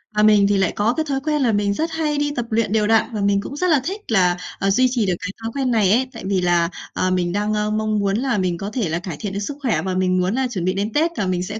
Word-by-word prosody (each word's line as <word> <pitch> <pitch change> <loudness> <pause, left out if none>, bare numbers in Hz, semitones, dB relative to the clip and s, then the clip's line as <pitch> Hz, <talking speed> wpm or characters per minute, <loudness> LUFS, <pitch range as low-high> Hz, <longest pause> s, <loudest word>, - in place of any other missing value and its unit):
Và 210 - +3
mình 210 -2 +5
thì 200 - +2
lại 190 -2 +2
có 220 +4 +1
cái 315 - -1
thói 270 -1 0
quen 300 -2 0
là 240 -3 +3
mình 205 -1 +1
rất 325 +8 -2
hay 310 -2 -1
đi 290 0 0
tập 240 -2 -2
luyện 220 -2 0
đều 215 -1 +2
đặn 225 -1 +4
và 210 - -2
mình 200 0 +2
cũng 275 - -7
rất 365 +4 0
là 310 -5 +4
thích 400 +4 -4
là, 180 -4 +3 0.2
ờ, 195 - +1
duy 255 +6 +4
trì 235 -5 +1
được 185 - +1
cái 185 +2 -5
thói 225 0 -4
quen 265 -3 -1
này 210 -5 +3
ấy. 255 +5 +3
Tại - - -9
vì 195 -1 0
là, 175 -1 +2 0.2
ờ, 185 - 0
mình 175 -1 0
đang, 210 +1 0
à, 210 0 0
mong 215 0 0
muốn 200 +1 0
là 255 -3 0
mình 180 -3 0
có 200 +4 -5
thể 225 -9 -1
là 165 +2 -1
cải 175 -5 -6
thiện 200 -2 -4
được 200 - -2
sức 275 +8 -5
khỏe 250 -5 0
và 190 -1 -2
mình 185 0 +1
muốn 185 +6 0
là 265 -1 0
chuẩn 185 -8 -4
bị 185 - +1
đến 205 +3 -2
Tết 325 +3 +2
là 200 - 0
mình 180 -1 -1
sẽ 205 +4 -5
210 Hz, 325 wpm, -21 LUFS, 190-250 Hz, 0.2 s, mình